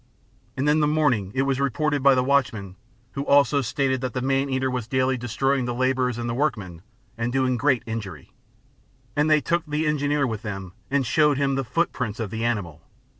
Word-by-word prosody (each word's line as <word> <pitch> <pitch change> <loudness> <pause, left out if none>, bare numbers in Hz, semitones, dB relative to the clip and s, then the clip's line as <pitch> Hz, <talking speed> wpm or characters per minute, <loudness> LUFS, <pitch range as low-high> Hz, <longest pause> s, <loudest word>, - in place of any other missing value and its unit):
And 135 +3 0
in 150 +1 +4
the 150 - +3
morning 140 -11 +1
it 135 - +2
was 135 -1 0
reported 140 +2 0
by 135 0 +6
the 125 - +2
watchman, 120 -9 0 0.4
who 140 - -4
also 140 0 +4
stated 130 +1 -1
that 130 -1 -4
the 125 - -1
man 135 +1 +1
eater 130 0 0
was 125 -3 -3
daily 130 +1 +1
destroying 125 +2 0
the 120 -1 -3
labourers 130 -1 0
and 120 0 -3
workmen, 105 - -2 0.4
and 120 +1 -1
doing 130 -1 +1
great 130 0 +1
injury; 100 - -6 0.8
And 150 +2 +2
they 155 -1 +4
took 170 +2 0
the 150 +2 -1
Engineer 145 -1 +1
with 110 -4 -3
them 95 -5 -6 0.2
and 140 -1 +1
showed 150 +3 +3
him 140 -1 +1
the 135 0 -1
footprints 125 -5 -2
of 110 -4 -3
the 115 0 -3
animal. 100 -10 -2
130 Hz, 195 wpm, -24 LUFS, 115-140 Hz, 0.8 s, by